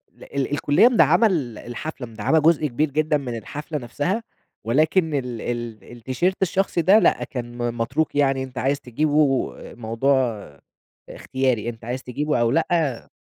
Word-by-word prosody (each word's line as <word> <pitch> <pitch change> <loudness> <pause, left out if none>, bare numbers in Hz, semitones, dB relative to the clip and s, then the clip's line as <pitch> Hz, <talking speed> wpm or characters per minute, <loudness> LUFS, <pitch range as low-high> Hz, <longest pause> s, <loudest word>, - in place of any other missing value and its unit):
ل - - -15
ال 140 0 -3
الكُلّية 145 +9 +4
مدعّمة 235 -1 +5
ال 140 - -2
الحفلة، 125 +2 -6
مدعّمة 115 +8 +1
جزء 155 -1 +3
كبير 145 +4 -1
جدًا 155 +1 +1
من 125 -4 -5
الحفلة 150 +7 -6
نفسها، 145 - -2 0.4
ولكن 155 - +2
ال 125 -5 -3
ال 120 -4 -4
التيشيرت 130 - -2
الشخصي 190 -1 +1
ده 195 +6 +6
لأ، 195 - +2
كان 120 -4 -6
م 120 -1 -2
متروك 135 +7 -1
يعني 135 -2 +2
أنت 130 -1 -10
عايز 140 +3 0
تجيبه، 145 +1 +1
موضوع 120 -1 -1 0.6
إختياري 130 -4 -1
أنت 115 -1 -9
عايز 125 +2 -4
تجيبه، 150 +4 -1
أو 115 0 +2
لأ 160 -5 0
135 Hz, 155 wpm, -23 LUFS, 120-155 Hz, 0.6 s, ده